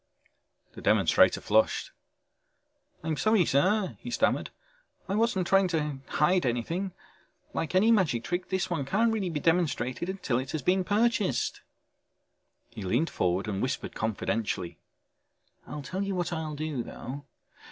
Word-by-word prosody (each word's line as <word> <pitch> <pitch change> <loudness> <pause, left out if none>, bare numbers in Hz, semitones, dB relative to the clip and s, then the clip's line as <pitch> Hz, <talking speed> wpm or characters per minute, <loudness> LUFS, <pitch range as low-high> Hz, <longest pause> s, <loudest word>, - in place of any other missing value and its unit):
The - - -10
demonstrator - - +4
flushed. - - +2 1.1
"I'm 160 -1 -1
sorry, 215 -5 +3
sir," 185 +9 +2
he 245 - -7
stammered. - - +1 0.6
"I 190 - -2
wasn't 210 -4 +1
trying 195 +1 +4
to 150 -5 -2
hide 175 +4 +2
anything. 155 +11 -1 0.6
Like 165 +2 -2
any 215 +5 +5
magic 170 - +2
trick 175 +1 -3
this 190 -1 0
one 170 -5 -1
can't 225 +11 +2
be 220 - 0
really 175 -6 -2
demonstrated 165 -2 0
until 185 -11 -1
it 130 +1 -5
has 155 -4 -2
been 185 +4 +3
purchased." 205 - +1 1.1
He - - -8
leaned 120 - 0
forward 90 +3 0
and 100 -2 -2
whispered 130 +1 -2
confidentially. 110 -4 -2 0.9
"I'll 150 - -6
tell 185 +8 -4
you 200 -1 -1
what 175 -1 -1
I'll 160 -2 -3
do 150 -3 -3
though. 135 +4 -7
165 Hz, 140 wpm, -28 LUFS, 130-190 Hz, 1.1 s, any